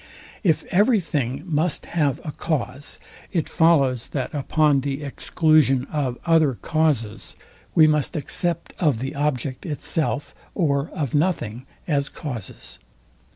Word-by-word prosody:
If 165 -6 +2
every 210 +5 +4
thing 140 -5 -2
must 160 -2 0
have 150 -5 0
a 155 - -4
cause, 145 -3 -2 0.3
it 170 -5 0
follows, 140 -8 +3
that 135 -3 -3
upon 145 0 +2
the 140 +1 -3
exclusion 145 -2 +2
of 135 -5 -1
other 160 -6 +4
causes 145 -8 -1 0.4
we 160 - +8
must 150 +1 +2
accept 170 +3 -2
of 150 -9 +2
the 135 +5 -4
object 140 -3 -1
itself 150 -1 -1 0.2
or 145 -5 +1
of 140 -6 -2
nothing 135 - 0 0.2
as 140 -4 +1
causes. 115 - -7
145 Hz, 125 wpm, -23 LUFS, 135-160 Hz, 0.4 s, we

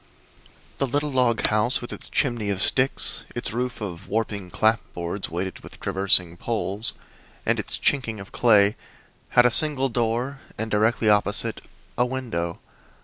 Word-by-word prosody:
The 135 - +1
little 145 +3 -1
log 125 -4 +2
house, 110 +4 +3
with 120 - -7
its - - -6
chimney 120 -6 -1
of 100 -2 -2
sticks, 130 +7 +2
its - - -4
roof 125 0 -3
of 90 -3 -6
warping 105 -3 -3
clapboards 95 -1 -1
weighted 90 +3 -4
with - - -13
traversing 95 -3 +2
poles 110 0 0 0.5
and - - +1
its - - 0
"chinking" 115 -6 0
of 95 - -11
clay, 105 -3 +4 0.6
had 120 - +8
a 125 - +4
single 135 0 +5
door 120 +3 -2 0.2
and, 110 +1 -4
directly 110 +2 +1
opposite, 105 0 +1 0.4
a 125 - +4
window. 115 -10 -4
110 Hz, 145 wpm, -24 LUFS, 100-125 Hz, 0.6 s, had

